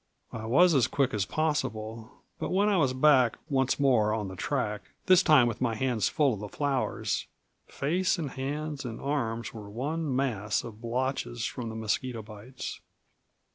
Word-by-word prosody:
I 110 -1 -6
was 175 +9 +5
as 135 -5 +4
quick 135 -2 0
as 100 -2 0
possible; 115 -8 -2 0.3
but - - -3
when 200 +3 +3
I 200 - +3
was 140 -6 +3
back 130 -2 +4
once 135 -2 +1
more 110 -6 +3
on 105 -3 -3
the 95 - -8
track, 105 -3 -2 0.2
this 185 -2 +6
time 150 -8 +6
with 120 -1 -2
my 115 -3 +1
hands 120 -3 +1
full 145 -5 +2
of 105 - -5
the 105 0 -6
flowers, 140 0 -1 0.4
face 180 +8 0
and 150 -6 -3
hands 145 +2 -4
and 115 -3 -6
arms 115 -6 -2
were 105 -3 -9
one 140 +6 -2
mass 110 -6 0
of 110 -2 -10
blotches 120 - -2
from 120 -2 -4
the 110 - -6
mosquito 110 +2 -2
bites. 110 +4 -8
130 Hz, 175 wpm, -29 LUFS, 110-145 Hz, 0.4 s, this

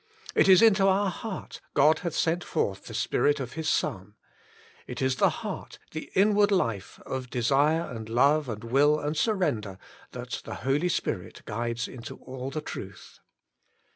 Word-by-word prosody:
It - - +4
is 190 +2 +7
into 195 -3 +5
our 195 0 +2
heart 205 +2 -7
God 155 +3 +5
hath 170 -3 -4
sent 170 +2 +1
forth 100 -11 -2
the - - -9
Spirit 145 0 +1
of 130 -2 -5
His 160 0 -2
Son. 105 -8 -1 0.7
It 125 - -6
is 130 -1 +1
the - - +4
heart, - - -6
the 155 - -6
inward 205 +1 +4
life 115 - -1
of 130 -2 -4
desire 140 +7 +2
and 110 -6 -7
love 140 +4 +3
and 110 -1 -5
will 145 +6 +3
and 150 +1 -2
sur 215 +7 +1
render, 110 - -1 0.4
that - - -5
the - - -6
Holy 145 +6 +2
Spirit - - -3
guides 115 +2 -3
into 120 -3 -9
all 130 0 -7
the 155 +3 -4
truth. 95 -9 -9
145 Hz, 170 wpm, -27 LUFS, 120-170 Hz, 0.7 s, is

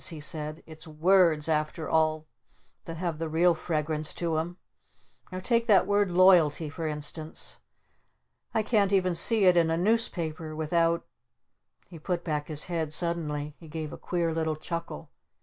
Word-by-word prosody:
he 160 -3 -8
said. 155 +1 -3
"It's 160 +1 -11
words 165 -1 +3
after 155 0 -1
all 155 -1 +1 0.6
that 165 0 -7
have 170 -2 -3
the 165 -1 -3
real 170 +3 +3
fragrance 155 -2 -3
to 170 -2 -2
'em! 175 +2 -5 0.7
Now 185 - -4
take 230 +3 +1
that 205 -5 +5
word 205 0 +2
'Loyalty' 175 -5 +4
for 160 +1 -4
instance. 150 - -5 0.9
I 220 - 0
can't 210 -3 +2
even 185 -2 +2
see 205 +5 +2
it 180 -1 +6
in 165 -2 +3
a 165 - +1
Newspaper 170 -6 -1
without 165 +2 +1 0.4
" - - -41
He 165 - -10
put 175 +2 -3
back 150 -3 -2
his 155 -2 -1
head 165 -4 -3
suddenly. 155 -3 -2
He 165 - -13
gave 155 -1 -6
a - - -5
queer 170 -2 -1
little 160 -1 -1
chuckle. 165 - -6
165 Hz, 165 wpm, -28 LUFS, 155-180 Hz, 0.9 s, it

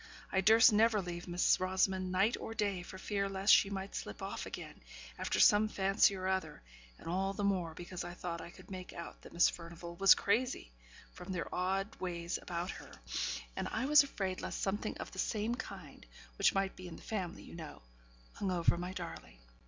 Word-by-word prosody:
I 190 - +2
durst 220 +3 +7
never 220 0 +4
leave 175 -2 -5
Miss 175 0 +3
Rosamond, 185 0 +1
night 195 +5 +3
or 225 - -6
day, 200 -4 0
for 185 +2 -9
fear 200 +1 -1
lest 195 +1 +4
she 195 - +6
might 195 0 -5
slip - - -5
off - - -5
again, - - -8 0.4
after - - 0
some 210 0 +6
fancy 195 -1 +3
or 185 0 -3
other; 190 - -2 0.3
and - - -12
all 190 +3 0
the 205 - -2
more, 180 -5 0
because 175 +1 -6
I 175 0 -7
thought 170 -2 -4
I - - -8
could 185 +2 -15
make 185 -1 -7
out 170 - -8
that - - -13
Miss 170 - +5
Furnivall 170 0 -7
was 195 +1 +8
crazy, 220 - 0 0.4
from 180 +2 -8
their 175 -4 -3
odd 195 +3 -1
ways 170 -2 -3
about 175 +1 -3
her; - - -10 0.6
and - - -2
I - - -2
was 295 +1 +8
afraid 195 -9 -3
lest - - -4
something 200 +1 -1
of - - -7
the - - -8
same 220 +1 0
kind 250 - -8 0.4
(which - - +4
might 195 0 0
be 185 - -9
in 170 - -8
the - - -13
family, 185 -6 -4
you - - -12
know) 160 - -9 0.5
hung 200 - -2
over 170 -1 +2
my 180 +1 -4
darling. 170 - -7
190 Hz, 200 wpm, -34 LUFS, 175-200 Hz, 0.6 s, was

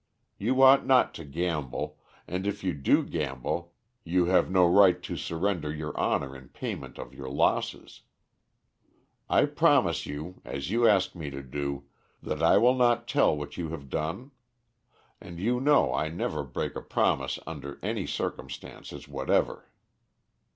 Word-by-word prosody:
You 130 +6 +2
ought 135 +1 +8
not 130 -1 +4
to 80 - -8
gamble, 75 -2 -3 0.3
and 95 +3 -3
if 100 0 -3
you 90 -2 0
do 70 -2 +2
gamble 75 +3 -3 0.3
you 90 +1 +2
have 90 +1 +3
no 95 -1 +5
right 90 0 +6
to 90 - -4
surrender 85 0 -2
your 75 0 -5
honor 70 -1 0
in 65 -2 -13
payment - - -6
of - - -8
your 65 -1 -7
losses. 70 - -1 1.3
I - - +4
promise - - +2
you, 80 +5 -7
as 70 +5 -5
you 115 +1 +4
ask 100 -3 +3
me 80 -5 -6
to 70 0 -7
do, 70 +1 -4 0.4
that 75 0 -3
I 80 - +5
will 125 +2 +5
not 120 -2 +2
tell 135 - +3
what 75 0 -7
you 85 -2 -3
have 70 -5 -8
done; 85 - -3 0.9
and 85 -1 -9
you 120 +6 +1
know 140 - +4
I 75 +3 0
never 80 - -2
break - - -4
a - - -4
promise - - 0
under 70 -3 -7
any - - -2
circumstances - - -6
whatever. - - -1
85 Hz, 155 wpm, -28 LUFS, 75-100 Hz, 1.3 s, ought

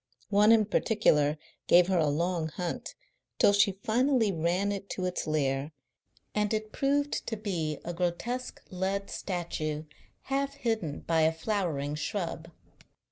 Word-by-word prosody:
One 210 +2 +6
in 220 -2 +6
particular 155 -9 +2 0.3
gave 175 0 +7
her 185 -1 +1
a 155 - +3
long 165 +2 0
hunt 175 +2 -5 0.4
till 200 - +5
she 200 -1 +4
finally 240 -1 +2
ran 180 +4 0
it 200 -1 -5
to 185 - -1
its 180 -2 -2
lair, 145 -1 0 0.6
and 210 -1 0
it 215 0 -4
proved 285 +3 0
to 225 - -2
be 205 -1 -4
the 175 - -1
shadow 155 -2 -3
of - - -8
a - - -17
grotesque 235 +9 -2
lead 190 +2 -2
statue 155 -5 -3 0.4
half 275 +1 -2
hidden 220 -11 -2
by 165 -1 +1
a 160 0 +4
flowering 165 -6 -2
shrub. 165 +1 -3
185 Hz, 155 wpm, -29 LUFS, 160-215 Hz, 0.6 s, gave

